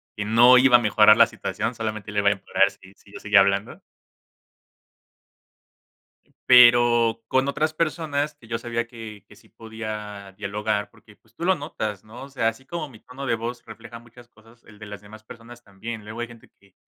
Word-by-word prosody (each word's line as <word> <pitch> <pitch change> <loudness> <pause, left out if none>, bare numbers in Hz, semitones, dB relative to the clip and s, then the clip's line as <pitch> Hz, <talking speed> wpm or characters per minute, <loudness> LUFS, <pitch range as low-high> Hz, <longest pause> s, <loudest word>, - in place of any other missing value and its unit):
que 105 - -4
no 120 +4 +6
iba 130 -1 +5
a - - +7
mejorar 105 -1 +5
la 115 - +6
situación, 110 +1 -5
solamente 110 -2 -6
le 105 - -1
va 100 - 0
a - - +2
empeorar 95 0 +1
si 95 0 -18
si 100 - -22
yo - - -9
seguía 105 -1 +4
hablando 100 +1 0 2.7
pero, 120 -2 +5
con 130 +3 +1
otras 155 +2 -1
personas 155 -2 -2
que 115 -5 -19
yo 115 0 -3
sabía 120 0 -4
que 110 -4 -11
que - - -18
sí - - -23
podía 105 -3 -8
dialogar 105 +1 -3
porque, 105 - -21
pues, 110 +2 -33
tú - - -8
lo 190 - +3
notas, 110 - -6
¿no? 115 +4 -12
O 140 - -11
sea, 125 -5 -1
así 125 +4 -12
como 155 +1 -6
mi 110 -5 -16
tono 130 +2 -10
de 115 - 0
voz 120 +2 -6
refleja 115 0 -12
muchas 120 +1 -18
cosas, 115 +1 -23
el 105 -2 -18
de 105 - -10
las 105 -1 -10
demás 110 +1 -15
personas 115 +2 -14
también, 110 +2 -9
luego 110 +3 -9
hay 120 - -4
gente 115 -1 -17
que 100 -1 -26
115 Hz, 200 wpm, -23 LUFS, 105-120 Hz, 2.7 s, a